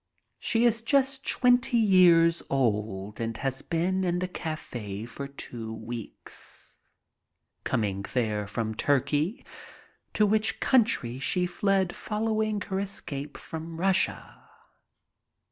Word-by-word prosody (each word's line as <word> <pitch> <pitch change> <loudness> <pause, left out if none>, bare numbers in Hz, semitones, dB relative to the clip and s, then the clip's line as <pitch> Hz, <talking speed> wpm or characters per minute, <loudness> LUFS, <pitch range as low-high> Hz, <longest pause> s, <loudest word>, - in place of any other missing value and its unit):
She 230 +1 +2
is 230 -1 +3
just 270 +3 +1
twenty 245 -1 +3
years 175 -6 +5
old 105 -5 -1
and 115 -1 -3
has 135 0 -2
been 180 +3 0
in 175 -1 +1
the 185 +1 -1
cafe 120 - -5
for 140 +4 -7
two 120 -5 -7
weeks, 115 0 -8 0.8
coming 100 -3 -1
there 105 -4 0
from 110 +1 -2
Turkey, 145 - 0 0.7
to 215 - +4
which 215 +1 +2
country 215 - +2
she 180 +6 +1
fled 190 -1 +1
following 215 -1 -1
her 190 0 -2
escape 150 -8 -5
from 160 0 -7
Russia. 190 +2 0
165 Hz, 110 wpm, -28 LUFS, -, 0.8 s, years